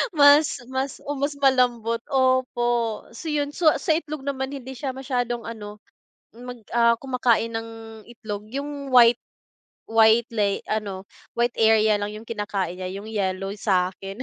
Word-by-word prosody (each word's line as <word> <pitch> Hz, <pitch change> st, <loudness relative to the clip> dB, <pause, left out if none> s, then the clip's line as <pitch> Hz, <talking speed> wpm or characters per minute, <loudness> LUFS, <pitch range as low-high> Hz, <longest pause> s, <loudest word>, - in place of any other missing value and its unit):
mas 285 Hz, -2 st, +5 dB
mas 265 Hz, +1 st, -3 dB
o 290 Hz, -, -4 dB
mas 285 Hz, +1 st, -1 dB
malambot, 245 Hz, -4 st, +2 dB
opo. 240 Hz, -4 st, +1 dB
So 235 Hz, +8 st, -9 dB
'yon, 290 Hz, -1 st, -1 dB
sa 315 Hz, 0 st, +3 dB, 0.2 s
itlog 305 Hz, -3 st, -2 dB
naman, 275 Hz, 0 st, -3 dB
hindi 265 Hz, -1 st, -8 dB
siya 265 Hz, 0 st, -5 dB
masyadong 245 Hz, -3 st, -2 dB
ano, 210 Hz, -2 st, -9 dB, 0.6 s
mag 245 Hz, -2 st, -9 dB, 0.4 s
kumakain 245 Hz, -3 st, +1 dB
ng 225 Hz, 0 st, -4 dB, 0.4 s
itlog. 215 Hz, -3 st, -7 dB
Yung 280 Hz, -1 st, -5 dB
white 240 Hz, -1 st, +7 dB, 0.7 s
white 225 Hz, +1 st, +5 dB
lay 200 Hz, -2 st, +1 dB
ano, 200 Hz, -3 st, -3 dB, 0.4 s
white 240 Hz, 0 st, +1 dB
area 220 Hz, -1 st, +4 dB
lang 205 Hz, +1 st, -4 dB
yung 220 Hz, +1 st, -10 dB
kinakain 200 Hz, -5 st, -3 dB
niya, 185 Hz, 0 st, -4 dB
yung 200 Hz, +2 st, -7 dB
yellow 195 Hz, -2 st, -2 dB
sa 185 Hz, -3 st, +1 dB
akin. 195 Hz, +6 st, -8 dB
235 Hz, 145 wpm, -24 LUFS, 215-265 Hz, 0.7 s, white